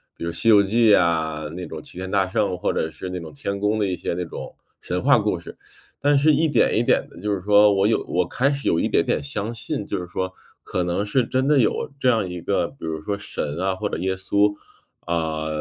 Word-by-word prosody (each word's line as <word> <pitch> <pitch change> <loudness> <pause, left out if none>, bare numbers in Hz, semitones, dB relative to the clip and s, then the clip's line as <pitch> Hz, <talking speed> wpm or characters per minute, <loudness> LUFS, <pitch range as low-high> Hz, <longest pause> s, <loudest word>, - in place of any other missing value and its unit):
比 - - -9
如 85 - -2
《西 115 - +2
游 105 -2 +8
记》 110 +2 +3
啊， 80 -3 0
那 90 - -5
种 80 -1 -7
齐 - - -11
天 95 0 -5
大 95 -2 +2
圣 100 -2 0
或 - - 0
者 80 - -1
是 90 +4 -7
那 90 0 -4
种 80 -2 -9
天 100 +7 -4
宫 105 +1 +1
的 100 - +1
一 90 - -1
些 85 - -3
那 90 +1 -2
种 - - -8 0.3
神 - - -2
话 - - +5
故 - - 0
事， - - -11 0.4
但 145 0 +3
是 155 +3 +5
一 160 +3 +3
点 145 - +2
一 120 - +3
点 - - +2
的 - - -14
就 105 0 -1
是 95 - -3
说 105 +1 +5
我 100 +1 +3
有 115 - +1
我 - - 0
开 140 +3 +1
始 140 0 -3
有 85 - +3
一 - - +1
点 - - +2
点 - - 0
相 100 +10 -3
信， 115 0 -4
就 100 - -2
是 90 - -6
说 95 +1 -3 0.3
可 90 - -2
能 90 +3 -1
是 125 +3 +1
真 130 +2 0
的 150 -1 +4
有 - - +1
这 130 - 0
样 110 -7 +2
一 90 0 -5
个， 100 +4 0
比 135 -11 -11
如 80 -1 -3
说 100 +4 -3
神 75 -6 -4
啊 95 0 0
或 105 +2 -3
者 - - -3
耶 95 +2 -1
稣 100 +2 +2 0.5
啊， 80 -2 -2
100 Hz, 275 characters per minute, -23 LUFS, 85-110 Hz, 0.5 s, 游